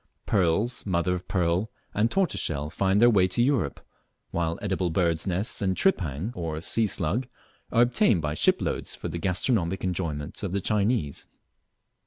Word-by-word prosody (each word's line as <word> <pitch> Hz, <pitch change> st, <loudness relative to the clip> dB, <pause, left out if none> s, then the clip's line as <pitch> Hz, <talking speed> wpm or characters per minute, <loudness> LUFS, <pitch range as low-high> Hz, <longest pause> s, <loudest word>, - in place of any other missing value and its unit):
Pearls, 105 Hz, +5 st, +1 dB
mother 90 Hz, -2 st, 0 dB
of 90 Hz, 0 st, -5 dB
pearl, 90 Hz, +3 st, 0 dB, 0.2 s
and 110 Hz, +3 st, +2 dB
tortoiseshell 80 Hz, -, -1 dB
find 95 Hz, +2 st, +2 dB
their 120 Hz, -, +7 dB
way 95 Hz, -4 st, +4 dB
to 95 Hz, +6 st, +1 dB
Europe, 125 Hz, -, 0 dB, 0.5 s
while 85 Hz, -1 st, -1 dB
edible 95 Hz, -3 st, -1 dB
birds' 85 Hz, +1 st, +1 dB
nests 95 Hz, +5 st, -2 dB
and 95 Hz, -2 st, 0 dB
"tripang" 90 Hz, -, 0 dB
or 80 Hz, -5 st, -4 dB
sea 110 Hz, +6 st, +1 dB
slug 105 Hz, +7 st, -1 dB, 0.4 s
are 120 Hz, -, +5 dB
obtained 125 Hz, -, +3 dB
by 75 Hz, -1 st, -2 dB
shiploads 75 Hz, -, 0 dB
for -, -, -5 dB
the 85 Hz, -, -4 dB
gastronomic 95 Hz, 0 st, 0 dB
enjoyment 85 Hz, -6 st, -3 dB
of 95 Hz, -3 st, -3 dB
the 100 Hz, -, +1 dB
Chinese. 100 Hz, -, 0 dB
95 Hz, 155 wpm, -26 LUFS, 85-110 Hz, 0.5 s, their